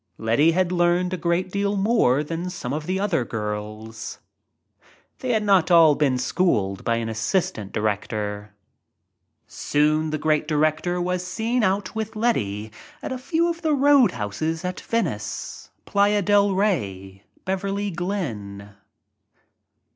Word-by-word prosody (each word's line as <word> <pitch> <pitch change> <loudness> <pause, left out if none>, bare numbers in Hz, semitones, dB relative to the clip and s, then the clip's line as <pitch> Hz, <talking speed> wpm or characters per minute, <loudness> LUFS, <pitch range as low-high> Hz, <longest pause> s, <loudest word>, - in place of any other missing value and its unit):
Letty 120 +9 +3
had 180 0 +1
learned 175 +1 +2
a - - +1
great 175 +2 -1
deal 200 +1 0
more 195 - +3
than 165 +4 -4
some 135 -8 -5
of 155 +1 -4
the 185 +1 0
other 195 -10 +1
girls 110 0 -5 0.5
— - - -32
they 255 -2 -2
had 220 -2 +1
not 195 -5 +3
all 165 -3 +7
been 140 -3 +1
schooled 120 - 0
by 115 - +1
an 115 -1 -2
assistant 110 - -1
director. 105 0 -3 0.9
Soon 155 +2 +1
the 155 - -1
great 155 0 +1
director 155 +3 +1
was 180 0 -1
seen 225 +7 -1
out 190 -1 0
with 220 0 -4
Letty 110 - -1 0.3
at - - -4
a 260 - -3
few 330 +5 0
of 340 0 -3
the 310 -2 +2
soadhouses 165 - +2
at 180 0 -3
Venice, 230 0 -3 0.2
Playa 205 0 +2
del 205 0 +3
Rey, 100 - -1 0.2
Beverly 195 +2 -2
Glen. 115 - -4
170 Hz, 140 wpm, -23 LUFS, -, 0.9 s, all